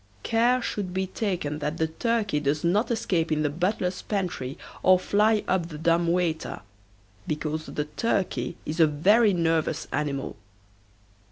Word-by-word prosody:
Care 240 +2 +2
should 185 -3 -3
be 190 0 +1
taken 180 -7 -2
that 150 +2 -3
the 160 - +2
turkey 205 +1 0
does 145 +1 -1
not 205 +7 +2
escape 175 -8 0
in 155 0 +1
the 145 - 0
butler's 180 +2 -1
pantry 180 -9 -3 0.2
or 185 0 +6
fly 210 +3 +2
up 180 -3 +1
the 155 -3 -8
dumb 170 +2 +2
waiter, 170 -3 -1 0.7
because 155 +1 -3
the 150 - -3
turkey 175 - -1
is 160 +3 -4
a 160 - +7
very 205 +9 +4
nervous 165 -3 0
animal. 140 -6 -2
170 Hz, 150 wpm, -26 LUFS, 150-200 Hz, 0.7 s, a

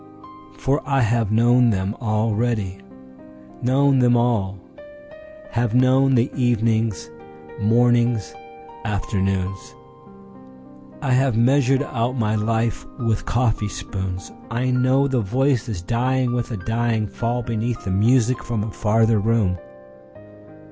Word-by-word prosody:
For 135 +3 0
I 135 -1 +1
have 115 -2 +1
known 120 +2 +4
them 100 0 -1
all 110 -1 0
already, 105 -3 -1 0.8
known 135 +2 +3
them 120 -1 +4
all:Have 295 - -4
known 130 +1 +4
the 120 +2 +2
evenings, 115 - 0 0.5
mornings, 120 +4 +2 0.5
afternoons,I 65 - -6
have 130 -2 +2
measured 135 +3 +3
out 125 -1 -2
my 110 -2 0
life 110 -1 -1
with 115 -3 -1
coffee 115 -3 0
spoons;I 100 +7 -5
know 130 +2 +2
the 130 -3 0
voices 120 -3 -1
dying 125 +5 0
with 120 +1 -2
a 115 - -4
dying 115 +2 -1
fallBeneath 115 +1 -3
the 95 - -3
music 115 +5 +2
from 115 -3 -2
a 110 - -5
farther 110 +2 +2
room. 105 -4 +1
115 Hz, 105 wpm, -21 LUFS, 105-125 Hz, 0.8 s, known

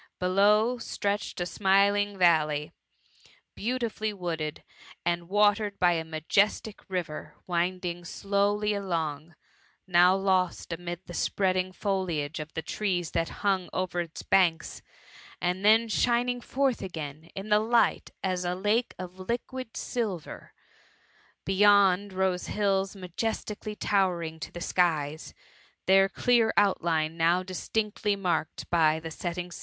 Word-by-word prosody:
Below, 210 +6 +3
stretched 205 -3 -3
a 175 - -1
smiling 200 +2 +2
valley, 155 -4 +3 0.8
beau 245 +4 -1
tifully 220 -3 -3
wooded, 165 -4 -4 0.4
and 170 0 -1
watered 205 0 +2
by 180 -1 +4
a 165 -2 0
majestic 195 +7 0
river 155 -5 -4
winding 175 0 -1
dowly 200 +3 0
alo»g; 165 -5 -3 0.5
now 180 0 +5
lost 185 -3 0
amidst 175 +1 -6
the 175 - -9
spreading 185 +1 0
foliage 180 -7 -2
of 155 +1 -6
the 160 - -3
trees 180 -2 -2
that 165 0 0 0.2
hung 190 -3 +1
«ver 185 -1 -2
its 170 -2 -5
banks, 170 -4 +2 0.6
and 180 +2 -1
then 220 +2 +5
twining 245 +3 +1
iforth 265 0 0
dgdni 160 -3 -7
in 195 +2 -6
the 210 0 +5
light 230 +2 +2
as 185 -1 -1
a 175 0 -1
lake 210 +6 0
of 185 0 -8
liquid 240 +4 -4
silver. 205 -10 -4 0.9
Beymid, 200 0 +4
rofie 185 -1 -1
iiiUi 195 -1 0
majestically 210 +3 -4
towering 175 -6 0
to - - -7
the 175 - -8
skiei^^ 160 -5 0 0.5
their 195 +1 +5
c^bar 235 +1 +3
outline 165 -5 +2
now 170 +2 +3
dietkctly 205 +2 -2
ttiarked 175 -4 -2
by 160 -2 +3
the 160 0 -7
setthg 170 +2 -4
TH|i 180 - -2
MUMMY. 180 - -14
185 Hz, 130 wpm, -28 LUFS, 170-205 Hz, 0.9 s, now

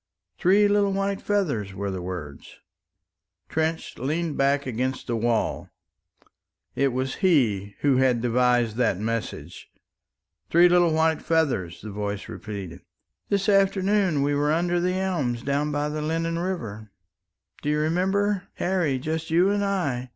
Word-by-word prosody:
"Three 200 +3 +4
little 205 -1 +2
white 195 0 -1
feathers," 140 - -1
were 100 0 -3
the 95 -1 -4
words. 85 -6 -7 0.9
Trench 160 +1 -2
leaned 155 +4 -2
back 140 +1 +1
against 130 +1 -2
the 120 - -2
wall. 115 0 -1 1.0
It 140 - +2
was 130 +2 -2
he 110 - +2
who 140 -3 +3
had 130 -2 +3
devised 120 -1 +2
that 120 -7 +2
message. 115 +2 -5 0.8
"Three 170 +2 +6
little 175 -1 +4
white 160 0 +2
feathers," 140 - 0
the 110 - -6
voice 105 0 -4
repeated. 100 -5 -7 0.5
"This 200 0 0
afternoon 195 -5 +2
we 145 +1 +1
were 145 +1 +1
under 175 +2 +1
the 180 +1 0
elms 150 -11 -1
down 145 +2 0
by 145 0 -1
the 150 0 -3
Lennon 165 +2 -1
River 115 - -4 0.7
do 145 - -2
you 150 - +2
remember, 190 +5 0
Harry? 175 -7 0
just 160 +4 -3
you 175 +4 +3
and 205 0 0
I. 145 -11 -1
150 Hz, 145 wpm, -25 LUFS, 120-180 Hz, 1.0 s, Three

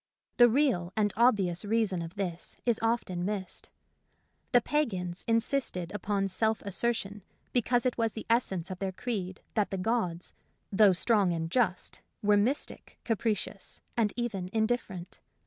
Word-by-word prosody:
The 240 -1 +8
real 230 -9 +2
and 210 -2 +2
obvious 200 -8 +3
reason 210 -4 +1
of 165 +3 -7
this 180 -4 -4
is 235 -3 +2
often 225 -6 0
missed. 195 -1 -4 0.8
The 245 - +7
pagans 195 -11 -1
insisted 230 -6 0
upon 200 -1 0
self 220 +3 0
assertion 205 0 -1 0.3
because 245 +1 +2
it 250 -1 0
was 225 -2 +1
the 220 - -7
essence 190 -7 +1
of 185 - -6
their 195 0 -1
creed 190 -4 -4
that 210 -3 +1
the 195 - -3
gods, 185 -4 -1 0.4
though 205 -1 +6
strong 195 -1 +2
and 165 0 -3
just, 220 -6 0 0.2
were 205 0 +5
mystic, 240 +8 0
capricious, 215 -3 -2 0.2
and 220 -3 +2
even 210 -7 -3
indifferent. 220 -5 -2
210 Hz, 145 wpm, -30 LUFS, 185-235 Hz, 0.8 s, The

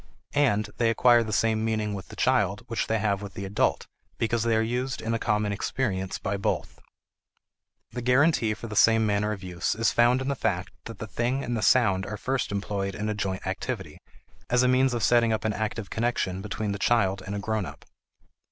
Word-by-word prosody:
And 105 -8 +2
they 115 -2 +2
acquire 120 +1 +5
the 110 - -5
same 110 0 +1
meaning 110 -2 -1
with 95 -2 -6
the - - -11
child - - +1
which - - -2
they 110 - +1
have 100 -2 0
with 100 -2 -8
the 100 - -5
adult 95 +1 0 0.3
because 115 0 0
they 115 0 +2
are 110 - +3
used 125 +3 -2
in 115 - -2
a 115 - 0
common 105 -2 0
experience 100 -2 -2
by 100 +1 -2
both. 100 - -2 1.1
The 120 +1 -5
guarantee 125 -3 +3
for 110 - -9
the 110 -2 -6
same 115 +1 +5
manner 105 0 +1
of 100 -3 -5
use 90 0 -2
is 115 +1 +2
found 120 +2 +4
in 130 - -4
the 140 - +1
fact 105 -7 -2
that 115 -3 -8
the 110 - -5
thing 120 +5 -1
and 120 - -2
the 110 - -2
sound 100 -7 +3
are 105 - -5
first 130 +2 -2
employed 100 -1 -2
in 105 0 -3
a - - 0
joint 95 -2 -3
activity, - - -4 0.5
as 125 0 +3
a - - +4
means 130 0 +3
of 115 - -2
setting 120 -1 +4
up 110 0 -1
an 110 - +1
active 110 -1 -4
connection 110 -5 -1
between 105 +1 -3
the 100 - -4
child 95 -4 +2
and 100 +2 -5
a - - -2
grownup. 110 -1 -4
110 Hz, 215 wpm, -26 LUFS, 100-120 Hz, 1.1 s, acquire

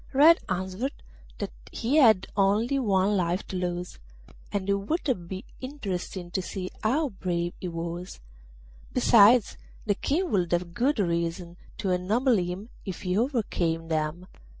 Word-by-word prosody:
Red 310 +5 +7
answered 190 - -2 0.4
that - - -4 0.2
he 250 +6 0
had 220 -10 +6
only 210 +7 +2
one 200 -3 +2
life 180 0 0
to 190 - -5
lose, 180 - -3 0.5
and 200 -2 -2
it 200 - +3
would 200 - -1
be 190 +2 -6
interesting 190 -9 -5
to 190 - -1
see 185 0 -5
how 280 +7 +2
brave 175 -4 -2
he 185 - -3
was; 170 +1 -5 0.7
besides, 235 -1 +6 0.3
the 205 - +2
King 330 - -1
would 180 -4 +1
have 175 0 -1
good 260 +7 +1
reason 170 -2 -1 0.2
to 190 - -1
ennoble 220 +7 +2
him 180 +4 -3
if 190 -1 -6
he 180 -1 0
overcame 190 - 0
them. 160 +2 -1
190 Hz, 145 wpm, -27 LUFS, 175-235 Hz, 0.7 s, Red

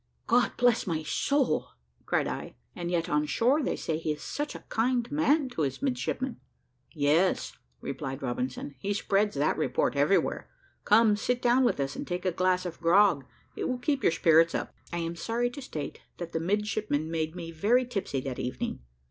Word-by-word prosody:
"God 240 +1 +3
bless 245 -4 +3
my 160 -3 -1
soul!" 275 - +1 0.4
cried - - +1
I, - - -5 0.2
"and 175 -1 -4
yet, 170 -2 0
on 150 0 +1
shore, 255 - +2
they - - -1
say 160 -1 -2
he 155 -2 -1
is 150 - -10
such 295 0 -4
a - - -10
kind 240 +1 +1
man 295 -1 +3
to 245 - -4
his 140 - -2
midshipmen." 260 -1 -2 0.5
"Yes," 155 +4 +2 0.3
replied 135 +1 -5
Robinson, 125 +2 -3
"he 200 +7 -1
spreads 205 +1 +1
that - - +1
report - - +1
everywhere. - - +1 0.4
Come, 215 0 +5
sit 245 +4 0
down 245 +1 +3
with 240 - +1
us 135 -1 -2
and - - -5
take 180 +1 -3
a 185 - +2
glass 185 +1 +1
of 175 -2 -6
grog; 170 -4 +4 0.3
it - - -2
will 255 - -1
keep 275 +2 0
your - - +4
spirits 165 0 +4
up." - - -3 0.2
I 175 - -2
am 165 0 -3
sorry 235 +7 -1
to 280 - -8
state 155 - -6 0.2
that 170 -1 -6
the 160 - -1
midshipmen 200 -4 -1
made 160 0 -2
me 170 -2 -6
very 225 +10 +2
tipsy 195 - -3
that 130 -1 -5
evening. 125 - -3
185 Hz, 190 wpm, -28 LUFS, 160-245 Hz, 0.5 s, Come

